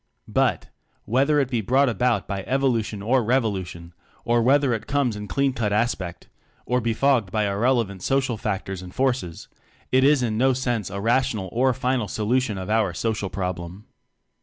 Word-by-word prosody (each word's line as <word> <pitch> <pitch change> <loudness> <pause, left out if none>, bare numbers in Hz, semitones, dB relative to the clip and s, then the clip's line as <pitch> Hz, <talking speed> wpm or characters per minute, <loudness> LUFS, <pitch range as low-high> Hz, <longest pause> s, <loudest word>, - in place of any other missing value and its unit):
But, - - 0 0.4
whether 140 +7 +2
it 135 -2 0
be 120 -3 0
brought 130 +7 +3
about 120 -3 0
by 100 -1 -3
evolu 130 -4 +1
tion 105 -1 -7
or 125 +3 +2
revolution, 95 -8 -2 0.3
or 120 0 +2
whether 135 +1 +3
it 110 - -4
comes 140 -5 0
in 105 0 -6
clean 135 +8 0
cut 110 -4 -1
aspect 100 -5 -2 0.4
or 125 0 0
befogged 115 -2 +1
by 105 +1 +1
ir 100 0 -2
relevant 115 -6 +1
social 130 +1 0
factors 95 -4 -4
and 90 -1 -11
forces, 125 -11 -1 0.4
it 130 +1 +4
is 140 -2 +4
in 110 -2 -1
no 130 +1 +4
sense 120 -6 -2
a 100 +1 -5
rational 115 -3 0
or 130 +3 +2
final 125 -3 -1
so 105 0 -4
lution 125 -4 +1
of 95 - -6
our 105 -5 +1
"social 110 -2 -2
problem." 90 +1 -5
115 Hz, 180 wpm, -24 LUFS, 100-130 Hz, 0.4 s, it